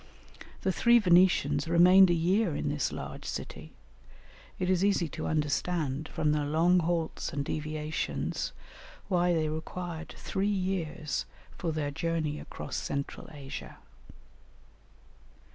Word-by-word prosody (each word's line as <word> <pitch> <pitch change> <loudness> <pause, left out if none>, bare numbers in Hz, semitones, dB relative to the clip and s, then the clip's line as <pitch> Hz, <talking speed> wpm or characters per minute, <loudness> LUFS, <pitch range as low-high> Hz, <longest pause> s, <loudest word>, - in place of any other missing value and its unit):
The 190 - +2
three 235 +6 +5
Venetians 180 -4 +4
remained 180 +3 +7
a 175 - +3
year 180 +1 +2
in - - -1
this - - -1
large - - -7
city; - - -6 0.9
it 185 - -1
is 185 0 +2
easy 195 -4 +2
to - - -5
understand, 150 -1 -1
from 150 - +1
their 150 -1 0
long 170 +4 +4
halts 165 -1 -1
and 140 0 -3
deviations, 155 +1 -3 0.6
why 180 -2 +3
they 160 -2 +1
required 165 +1 -5
three 195 +1 -2
years 180 -6 -2 0.3
for 170 - -2
their 150 -2 -2
journey 155 -1 -2
across - - -6
Central 140 0 -4
Asia. 140 -3 -8
165 Hz, 125 wpm, -30 LUFS, 155-180 Hz, 0.9 s, remained